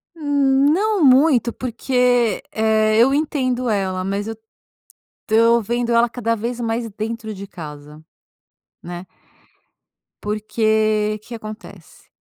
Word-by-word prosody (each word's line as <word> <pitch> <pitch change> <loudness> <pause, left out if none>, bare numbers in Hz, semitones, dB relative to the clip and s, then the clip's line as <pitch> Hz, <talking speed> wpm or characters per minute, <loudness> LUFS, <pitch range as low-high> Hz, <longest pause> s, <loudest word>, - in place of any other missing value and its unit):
Hum, 280 -3 +2
não 410 +1 +1
muito 260 -3 +4
porque, 250 -1 0
eh, 220 0 +2
eu 265 +4 +5
entendo 255 -5 -1
ela. 190 -3 -1
Mas 200 +2 -2
eu 225 - -5 0.9
tô 230 +1 +4
vendo 240 +2 -2
ela 235 +1 +4
cada 230 -1 -2
vez 235 +3 -4
mais 230 0 -2
dentro 220 +1 -5
de 200 +1 -8
casa, 150 -3 -10 0.8
né? 175 +1 -8 1.2
Porque 215 0 0
que 240 - -9
acontece? 215 -1 -11
230 Hz, 115 wpm, -20 LUFS, 215-250 Hz, 1.2 s, eu